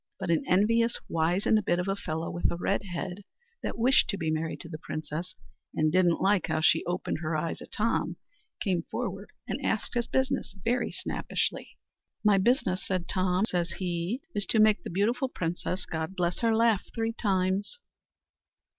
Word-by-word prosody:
But 185 -3 -1
an 165 - +2
envious 230 +5 +3
wizened 180 +6 +2
bit 175 - +2
of 180 +1 -1
a 195 - +1
fellow, 160 -4 -3
with 175 - 0
a - - -2
red 195 +3 0
head, 180 +2 -5 0.4
that - - -3
wished 250 +4 +4
to 200 - 0
be 160 -3 -1
married 160 0 -2
to - - -9
the 155 -2 -7
princess, 155 +4 -5 0.4
and 155 0 +2
didn't 175 -1 +3
like 195 -1 +3
how - - 0
she 160 +1 +4
opened 175 -2 -2
her 155 -1 -2
eyes 165 +2 -3
at - - -11
Tom, 225 +2 0 0.4
came 185 -5 +1
forward - - -4 0.2
and - - -3
asked - - -1
his 240 -1 0
business 265 -6 0
very 245 +1 +1
snappishly. - - -2 0.5
"My 205 -2 +5
business," 190 -4 +2
said 185 -3 -2
Tom, 185 +1 +1
says 175 -4 0
he, 180 +7 -2
"is 205 -2 -2
to 220 - +3
make 215 -4 +5
the - - -6
beautiful 235 +9 +1
princess, 180 -1 -2
God 160 +3 -4
bless 175 -1 0
her, 230 -1 +3
laugh 225 -3 +4
three 225 -1 0
times." 195 - 0
185 Hz, 180 wpm, -29 LUFS, 170-215 Hz, 0.5 s, My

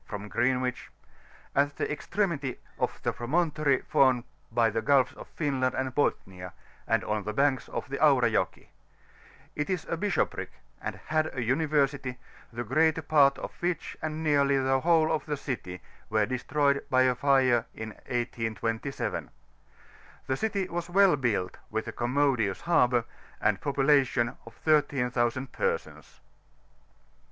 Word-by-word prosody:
from 105 -1 -6
Greenwich, 125 +1 0 0.7
at 145 +1 +2
the - - -2
extremity 150 -4 -2 0.2
of - - -1
the - - 0
promontory 150 +1 +1
formed 130 -3 +3 0.3
by 115 0 +3
the 115 +1 -1
Gulfs 135 -1 +3
of - - -11
Finland 135 -5 -1
and 130 -1 -2
Bothnia, 95 -9 -2 0.3
and 115 - +2
on 105 0 -1
the 105 +2 -4
banks 135 +1 +1
of - - -4
the - - -3
Aura - - +5
Jocki; - - -1 0.9
it 150 - -2
is 185 -3 -1
a 170 - -2
bishoprick, 200 +3 -1 0.3
and - - -4
had 155 0 +1
a 120 - 0
University, 140 -1 0 0.3
the 120 +1 -4
greater 155 +6 +2
part 140 -3 +4
of - - -6
which, 175 -2 -2
and 155 0 -3
nearl^jr 140 -2 +3
the 135 0 +2
whole 160 +1 +3
of 160 - -1
the 150 -1 -2
city, 95 -10 -5 0.3
were 110 -1 +2
destroyed 140 +3 0
by 130 -1 +4
mre 130 -2 +3
in 110 0 -6 0.2
1827. 115 +1 -2 1.0
The 130 - 0
city 200 +2 -1
was 175 0 -4
well 195 -2 +5
built, 110 -9 -1
with 110 +1 -3
a - - -3
commodious 125 -4 0
harbour, 125 -8 +3 0.3
and - - +2
a - - -25
population 135 -3 +2
of 115 - -12
13,000 130 -4 +1
persons. 475 -1 -3
135 Hz, 145 wpm, -28 LUFS, 120-150 Hz, 1.0 s, Aura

